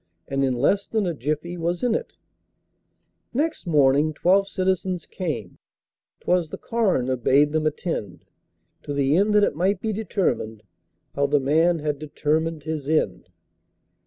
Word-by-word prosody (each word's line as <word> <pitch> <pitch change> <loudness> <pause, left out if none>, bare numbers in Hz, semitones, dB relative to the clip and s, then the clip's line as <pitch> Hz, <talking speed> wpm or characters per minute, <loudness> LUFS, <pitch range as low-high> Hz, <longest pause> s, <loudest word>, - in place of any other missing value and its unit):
And 135 0 -1
in 130 -2 +1
less 195 +11 +1
than 220 -3 0
a 175 - -1
jiffy 155 +5 -3
was 170 +3 -2
in 245 -2 +2
it! - - -4 1.2
Next 310 - -1
morning 145 0 +3
twelve 195 +5 +3
citizens 185 -2 -1
came 140 - -5 0.6
('Twas 175 -3 +1
the - - -6
coroner 185 - 0
bade 140 +4 +3
them 155 0 +1
attend), 150 - -4 0.6
To 145 - -5
the 140 +1 +2
end 205 +3 +3
that 210 - +5
it 145 - +1
might 185 +4 +1
be 220 +1 -2
determined 180 - -2 0.5
How 140 0 +1
the 145 +1 +3
man 160 +6 +3
had 150 -2 -2
determined 155 +1 -1
his 155 -2 -4
end! 155 - 0
155 Hz, 150 wpm, -24 LUFS, 140-185 Hz, 1.2 s, that